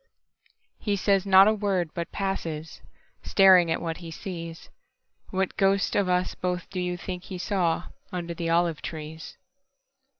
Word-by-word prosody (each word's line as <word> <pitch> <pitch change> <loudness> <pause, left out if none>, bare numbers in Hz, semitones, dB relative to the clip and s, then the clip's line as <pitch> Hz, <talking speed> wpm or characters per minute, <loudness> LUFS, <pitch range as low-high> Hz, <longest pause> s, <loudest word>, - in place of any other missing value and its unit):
He 205 -2 0
says 195 0 +1
not 195 +1 +8
a 215 - +4
word, 195 -6 -1
but 170 -1 -4
passes, 165 -5 -4 0.4
Staring 185 -3 +6
at 160 - 0
what 165 -1 -3
he 170 -2 -9
sees. 165 -1 -7 0.6
What 190 0 -2
ghost 195 0 +2
of 200 -2 +2
us 180 0 +1
both 180 -1 -3
do 185 - -3
you 180 0 -2
think 180 0 -6
he 185 - -6
sawUnder 175 -1 -2
the 165 0 -3
olive 170 -1 +1
trees? 155 0 -7
180 Hz, 145 wpm, -26 LUFS, 165-195 Hz, 0.6 s, not